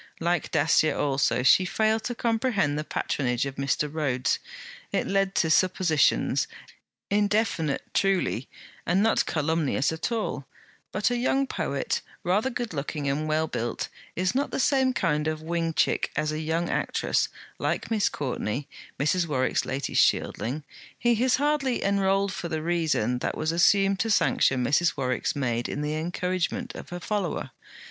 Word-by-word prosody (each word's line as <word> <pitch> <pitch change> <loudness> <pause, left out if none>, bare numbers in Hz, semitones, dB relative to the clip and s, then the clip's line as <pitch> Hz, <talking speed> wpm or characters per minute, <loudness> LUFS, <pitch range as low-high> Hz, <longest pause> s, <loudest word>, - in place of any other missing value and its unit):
Like 170 -1 0
Dacier 155 +1 +3
also, 135 -3 +1
she 185 - +6
failed 220 +3 +1
to 245 - -2
comprehend 225 - +1
the 150 - -2
patronage 125 -4 -1
of 135 -1 -6
Mr. 140 +2 0
Rhodes: 135 -5 0 0.5
it - - 0
led 195 0 0
to 160 - +2
suppositions; 180 -3 +2 0.6
indefinite 205 -7 +1
truly, 185 - +1 0.3
and 185 +4 +2
not 225 - +2
calumnious 155 -3 0
at 160 +8 -3
all; 210 - -2 0.4
but 210 +4 +1
a 245 - +1
young 270 +3 +1
poet, - - -2 0.2
rather 205 +8 +1
good 240 -5 -4
looking 145 0 -3
and 145 +3 -1
well 155 +1 +1
built, 120 -6 -3 0.3
is 185 +3 0
not 275 +3 0
the - - -3
same 265 -1 +3
kind 155 -10 0
of 155 0 -3
wing 165 0 -1
chick - - +1
as 150 +1 0
a 155 - -3
young 160 +2 -1
actress, - - 0 0.3
like - - -2
Miss 215 -2 +2
Courtney 135 -1 -3 0.3
Mrs. 170 +5 +1
Warwick's 130 -4 0
latest 135 +1 +1
shieldling: 135 +7 0 0.3
he 240 -2 +2
is 255 -1 +4
hardly 280 -3 0
enrolled 195 0 +1
for 170 - -5
the 160 -1 -3
reason 155 -8 0
that - - -2
was 155 +1 0
assumed 195 +3 +3
to 225 - 0
sanction 130 - +3
Mrs. 150 +7 +2
Warwick's 130 +1 -1
maid 120 -4 -1
in 145 - -3
the 150 +1 -1
encouragement 175 +2 -2
of - - -9
her 175 - -5
follower. 205 +3 -2
165 Hz, 155 wpm, -26 LUFS, 145-200 Hz, 0.6 s, she